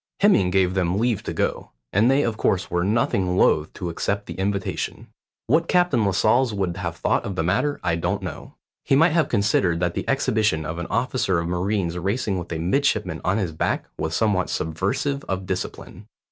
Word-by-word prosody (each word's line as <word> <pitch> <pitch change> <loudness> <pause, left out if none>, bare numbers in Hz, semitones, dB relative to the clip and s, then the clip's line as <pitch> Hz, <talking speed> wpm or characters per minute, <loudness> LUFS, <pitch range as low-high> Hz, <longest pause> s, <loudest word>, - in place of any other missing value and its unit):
Hemming 195 - +4
gave 90 -1 +2
them 90 -1 0
leave 115 -2 +1
to - - -5
go, - - -2 0.2
and 110 +5 +4
they 135 +2 +3
of 115 -2 -1
course 95 -3 0
were 85 0 +1
nothing 95 -3 +1
loath 75 -4 +3
to 90 -2 -4
accept 100 +4 -2
the - - -7
invitation. 100 0 -3 0.4
What 160 +6 +2
Captain 175 - +3
Lascelles 110 +4 +2
would 95 -3 -1
have 85 -2 -4
thought - - +1
of 100 - -4
the 80 - 0
matter 100 - 0
I 85 -1 +1
don't 85 - -2
know. - - -7 0.3
He - - +2
might 165 +4 +5
have 160 -3 +2
considered 100 -5 +2
that 90 -1 0
the - - -4
exhibition 110 - +1
of 80 +2 -4
an 85 - -4
officer 125 -8 0
of 85 0 -1
marines 90 0 -1
racing 100 +1 -1
with 85 - -8
a 85 - -2
midshipman 95 - 0
on 95 +3 +1
his 95 -6 -1
back 80 - -1
was 80 0 -2
somewhat 100 -3 +1
subversive 100 - -2
of 95 0 -3
discipline. 90 0 -5
95 Hz, 195 wpm, -23 LUFS, 90-115 Hz, 0.4 s, might